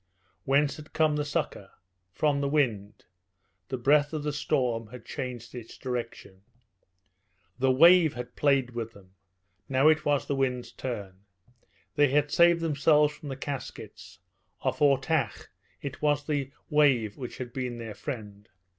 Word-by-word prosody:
Whence 140 Hz, +1 st, +2 dB
had 155 Hz, 0 st, -13 dB
come 155 Hz, -1 st, +2 dB
the 150 Hz, -, 0 dB
succour? 145 Hz, -, -3 dB, 0.4 s
From 145 Hz, -, +1 dB
the 140 Hz, -, 0 dB
wind. 110 Hz, -8 st, -1 dB, 0.6 s
The 130 Hz, -, -2 dB
breath 145 Hz, +4 st, +3 dB
of 155 Hz, -2 st, -3 dB
the 150 Hz, -1 st, -2 dB
storm 120 Hz, -6 st, -1 dB
had 120 Hz, 0 st, -12 dB
changed 125 Hz, -4 st, -6 dB
its 120 Hz, -3 st, -9 dB
direction. 120 Hz, -6 st, -6 dB, 1.2 s
The 130 Hz, +1 st, +3 dB
wave 165 Hz, +4 st, +6 dB
had 125 Hz, 0 st, -7 dB
played 140 Hz, -3 st, +2 dB
with 115 Hz, -1 st, -5 dB
them; 95 Hz, -2 st, -18 dB, 0.6 s
now 135 Hz, +3 st, +5 dB
it 155 Hz, -1 st, +3 dB
was 145 Hz, -2 st, +1 dB
the -, -, -2 dB
wind's 130 Hz, -2 st, -1 dB
turn. 100 Hz, -7 st, -6 dB, 0.7 s
They 145 Hz, -2 st, +4 dB
had 145 Hz, +1 st, +1 dB
saved 170 Hz, 0 st, +5 dB
themselves 150 Hz, -1 st, +3 dB
from 150 Hz, -1 st, -10 dB
the 135 Hz, -, -4 dB
Caskets. 110 Hz, -8 st, -7 dB, 0.4 s
Off 130 Hz, -1 st, -1 dB
Ortach 145 Hz, +2 st, +1 dB, 0.3 s
it 140 Hz, 0 st, -6 dB
was 145 Hz, -1 st, +1 dB
the 145 Hz, -3 st, -1 dB, 0.2 s
wave 130 Hz, -8 st, +3 dB
which 125 Hz, -3 st, -7 dB
had 120 Hz, -2 st, -7 dB
been 125 Hz, -3 st, -3 dB
their 115 Hz, -2 st, -6 dB
friend. 105 Hz, -6 st, -7 dB
135 Hz, 150 wpm, -28 LUFS, 120-150 Hz, 1.2 s, wave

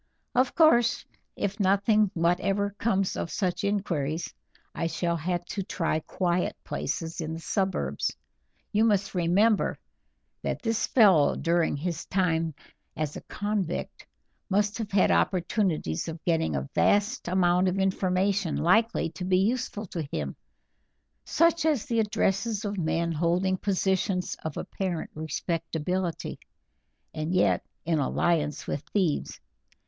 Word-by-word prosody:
Of 255 Hz, +1 st, +2 dB
course, 240 Hz, -8 st, +4 dB, 0.3 s
if 200 Hz, +2 st, -3 dB
nothing 200 Hz, +2 st, +3 dB
whatever 195 Hz, +4 st, +1 dB
comes 195 Hz, -4 st, +1 dB
of -, -, -3 dB
such 180 Hz, +4 st, -1 dB
inquiries, 175 Hz, -6 st, -1 dB, 0.4 s
I 165 Hz, -, -1 dB
shall 170 Hz, 0 st, -1 dB
have 175 Hz, +2 st, -2 dB
to 195 Hz, -, -4 dB
try 165 Hz, -4 st, -1 dB
quiet 175 Hz, +2 st, -1 dB
places 165 Hz, 0 st, -3 dB
in 160 Hz, 0 st, -3 dB
the 165 Hz, -, -5 dB
suburbs; 190 Hz, +3 st, -1 dB, 0.5 s
you 215 Hz, +1 st, +3 dB
must 205 Hz, -3 st, +2 dB
remember 190 Hz, +5 st, +2 dB, 0.6 s
that -, -, -3 dB
this 225 Hz, -2 st, 0 dB
fellow 195 Hz, -, +5 dB
during 170 Hz, -3 st, +1 dB
his 170 Hz, +2 st, -4 dB
time 165 Hz, -4 st, 0 dB, 0.4 s
as 150 Hz, -2 st, -2 dB
a -, -, -6 dB
convict 205 Hz, -4 st, -3 dB, 0.4 s
must 205 Hz, +3 st, +1 dB
have 220 Hz, -3 st, -3 dB
had 195 Hz, -1 st, +4 dB
opportunities 175 Hz, -, 0 dB
of 165 Hz, 0 st, -7 dB
getting 160 Hz, -, +1 dB
a 65 Hz, -1 st, -2 dB
vast 205 Hz, +3 st, +2 dB
amount 180 Hz, 0 st, +3 dB
of 185 Hz, +1 st, 0 dB
information 190 Hz, -1 st, +1 dB
likely 220 Hz, +2 st, +2 dB
to 180 Hz, -, -7 dB
be 185 Hz, 0 st, +2 dB
useful 215 Hz, +1 st, 0 dB
to 170 Hz, -3 st, -4 dB
him, -, -, -3 dB, 0.9 s
such 335 Hz, -1 st, +3 dB
as 305 Hz, -8 st, +1 dB
the 230 Hz, -1 st, 0 dB
addresses 210 Hz, 0 st, 0 dB
of 205 Hz, 0 st, -2 dB
men 170 Hz, -1 st, 0 dB
holding 175 Hz, +4 st, +1 dB
positions 190 Hz, -1 st, 0 dB
of 160 Hz, -2 st, -4 dB
apparent 180 Hz, -4 st, -3 dB
respectability, 165 Hz, +2 st, -3 dB, 0.7 s
and 155 Hz, +4 st, -2 dB
yet 180 Hz, -, +3 dB, 0.2 s
in 160 Hz, -1 st, +1 dB
alliance 150 Hz, +1 st, 0 dB
with 140 Hz, -, -3 dB
thieves. 185 Hz, -8 st, 0 dB
185 Hz, 130 wpm, -27 LUFS, 165-205 Hz, 0.9 s, fellow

